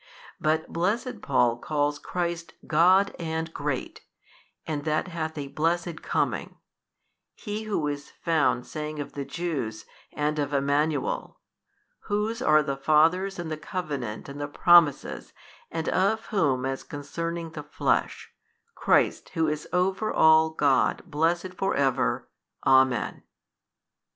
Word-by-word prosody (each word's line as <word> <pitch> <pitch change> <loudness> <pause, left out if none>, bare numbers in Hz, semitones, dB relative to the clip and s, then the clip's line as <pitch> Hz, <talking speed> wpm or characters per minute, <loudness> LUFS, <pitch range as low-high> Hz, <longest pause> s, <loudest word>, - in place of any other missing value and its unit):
But 155 +1 0
blessed 215 +9 -1
Paul 120 -3 +2
calls 145 0 -1
Christ 170 0 -3
God 185 +5 +4
and 160 -1 -3
Great 145 -3 -3 0.6
and 150 -2 -3
that 155 +3 0
hath 160 -2 -4
a 140 -1 -4
blessed 165 +2 -1
coming, - - -2 0.8
he 215 0 -5
who 200 -8 -1
is 145 -1 -4
found 155 -7 0
saying 155 0 -5
of 145 - -6
the 140 -1 -4
Jews, 135 -12 -4 0.3
and 150 +1 -1
of 145 0 -1
Emmanuel, 145 +1 0 0.7
Whose 215 +3 -1
are 155 -5 +5
the 140 -1 -3
fathers 165 +7 +3
and 170 -2 -5
the 155 - -2
covenant 145 -9 -5
and 140 +1 -7
the 145 - -2
promises 145 - +3 0.4
and 165 -1 -4
of 210 +4 +1
whom 135 -10 +2
as 135 0 -2
concerning 165 +3 -5
the - - -6
flesh, - - -1 0.4
Christ - - +2
Who 160 -1 +2
is 150 0 -3
over 190 +4 +1
all 160 0 +5
God 140 -5 +2
23 - - -22
blessed 170 +4 0
for 195 +1 -1
ever. 130 - +1 0.4
Amen. 130 -2 +3
155 Hz, 130 wpm, -26 LUFS, 145-175 Hz, 0.8 s, are